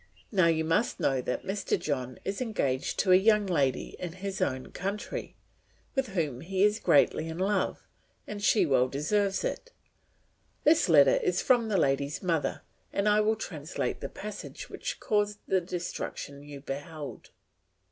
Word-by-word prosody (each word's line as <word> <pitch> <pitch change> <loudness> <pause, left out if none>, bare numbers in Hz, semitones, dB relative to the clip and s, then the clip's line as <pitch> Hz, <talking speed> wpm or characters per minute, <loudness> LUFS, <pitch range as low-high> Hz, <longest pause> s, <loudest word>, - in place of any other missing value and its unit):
Now 185 -6 +4
you 160 -1 +2
must 165 +8 +1
know 135 -2 +1
that 125 - -3
Mr. 195 +2 -1
John 130 -4 -3
is 195 +4 -3
engaged 140 - -1
to 190 - +2
a - - +9
young 210 +2 +4
lady 140 -9 0
in 175 -2 -5
his 190 +1 -5
own 130 -1 -1
country, 200 +3 -4 0.6
with 270 -2 0
whom 145 -8 -1
he 190 +2 0
is 210 +1 +3
greatly 155 +2 +3
in 160 - -5
love, 195 +2 0 0.4
and 205 -1 -6
she 205 -2 +4
well 130 -4 +3
deserves 195 +9 0
it. - - -3 0.9
This 305 - +4
letter 145 -4 +7
is 180 0 0
from 245 -3 +4
the 210 -3 +1
lady's 140 0 0
mother, 165 -4 0 0.3
and 200 +1 0
I 210 0 +5
will 215 +1 +2
translate 160 -7 -4
the - - -4
passage - - -8
which - - -4
caused 210 -2 +1
the 190 -1 +2
destruction 170 -5 -5
you 145 -1 -10
beheld. 145 +2 -7
180 Hz, 160 wpm, -29 LUFS, 145-205 Hz, 0.9 s, a